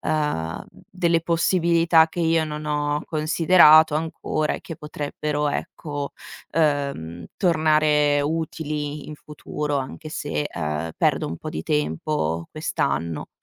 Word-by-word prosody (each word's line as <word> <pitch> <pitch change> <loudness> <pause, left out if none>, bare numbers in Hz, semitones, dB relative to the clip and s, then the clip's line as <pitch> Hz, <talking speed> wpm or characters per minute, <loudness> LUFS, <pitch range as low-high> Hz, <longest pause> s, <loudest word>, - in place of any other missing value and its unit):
ehm, 150 - -2
delle 170 -2 -1
possibilità 170 -1 +3
che 175 - -5
io 165 -1 +2
non 150 0 -6
ho 150 0 -1
considerato 160 -1 +5
ancora 155 -1 -1
e - - -6
che 165 - -8
potrebbero, 150 0 -3
ecco, 145 -2 -4 0.4
ehm, 140 - -1
tornare 155 -4 +3
utili 150 -1 -3
in 155 - -6
futuro, 150 0 -4
anche 150 +4 -6
se, 150 -1 -3
ehm, 75 - -3
perdo - - +1
un 85 - -5
po' - - -7
di 80 - -4
tempo 80 - -1
quest'anno. 80 +1 -2
150 Hz, 120 wpm, -23 LUFS, 145-160 Hz, 0.4 s, considerato